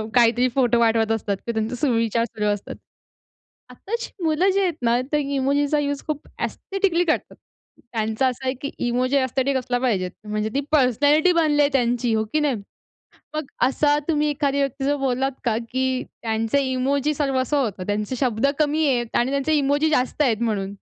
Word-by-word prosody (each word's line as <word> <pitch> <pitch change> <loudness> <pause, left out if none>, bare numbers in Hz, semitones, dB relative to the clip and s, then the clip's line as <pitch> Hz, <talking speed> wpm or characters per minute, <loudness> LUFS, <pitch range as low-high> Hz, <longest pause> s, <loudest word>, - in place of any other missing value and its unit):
काहीतरी 240 +1 +4
फोटो 245 -3 +3
पाटवत 225 -1 +2
असतात, 205 -3 -1
की - - +1
त्यांचा 220 +2 -2
सुविचार 230 -3 +1
सुरू 210 -2 -4
असतात. 205 - -7 0.9
आत्ताची 425 - -5
मुलं 325 +4 +2
जी 395 - +2
आहेत 360 -3 +1
ना 235 +1 +3
ते 300 - +2 0.2
इमोजीचा 285 +2 +1
युज 285 -1 -2
खूप 300 -1 -4 0.2
एस्थेटिकली 385 -3 0
करतात. 315 - -1 0.6
त्यांचा 220 +3 0
असा 255 +1 -4
आहे, 260 - +1
की 280 - -4 0.2
इमोजी 255 +3 +1
एस्थेटिक 265 +1 +1
असला 250 -1 -1
पाहिजेत. 195 -8 0 0.2
म्हणजे 215 +1 -1
ती 280 - +1
पर्सनॅलिटी 290 +5 +4
बनली 305 -3 +3
आहे 285 - +4
त्यांची 240 -2 +1
हो 220 0 +1
की 310 - +3
नाही. 290 -5 +1 0.8
मग 305 -2 -3 0.2
असा 290 +2 +2
तुम्ही 300 -1 +2
एखाद्या 280 -1 0
व्यक्ती 275 0 -2
जर 290 +1 +1
बोललात 270 0 0
का, 225 -2 +1
की 260 0 0
त्यांचे 225 +4 -1
इमोजी 280 +3 0
सर्वस्व 270 0 0
होतं, 205 -8 -2
त्यांचे 210 +4 -2
शब्द 245 -1 +1
कमी 305 +1 +2
आहेत 240 -3 0
आणि 245 +2 +2
त्यांचे 280 +3 0
इमोजी 290 +2 +2
जास्त 260 +1 +1
आहेत 235 -6 +2
म्हणून. 200 -3 -1
260 Hz, 175 wpm, -23 LUFS, 235-290 Hz, 0.9 s, काहीतरी